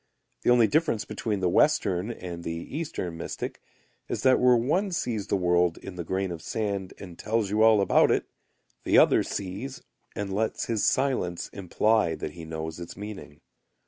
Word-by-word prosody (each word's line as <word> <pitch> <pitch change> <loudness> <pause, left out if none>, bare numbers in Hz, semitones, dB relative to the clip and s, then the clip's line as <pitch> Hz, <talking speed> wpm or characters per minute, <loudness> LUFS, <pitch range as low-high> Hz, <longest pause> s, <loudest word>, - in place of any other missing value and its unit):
The - - +1
only 120 -2 +6
difference 150 -4 +1
between 105 -1 -3
the 90 - +2
Western 95 - +2
and 90 -6 -6
the 85 +9 -5
Eastern 120 - -4
mystic 85 - -5 0.5
is - - -3
that 130 -1 +5
where 125 0 +5
one 155 - +1
sees 115 - -2
the - - +1
world 90 -2 +2
in 95 - -9
the 90 -1 -5
grain 95 +2 -2
of 85 -2 -6
sand 100 -3 -3
and 90 -3 -11
tells 110 -2 -1
you 105 +1 +2
all 110 -2 +6
about 95 - +4
it, - - +1 0.6
the - - +3
other - - +6
sees 100 +8 -5 0.3
and 100 -1 -3
lets 110 +3 -1
his 115 -3 -1
silence 130 -11 0
imply 100 -1 +1
that 75 - -5
he 85 0 -10
knows 80 +1 -5
its 85 - -8
meaning. 105 -7 -9
100 Hz, 175 wpm, -27 LUFS, 90-115 Hz, 0.6 s, only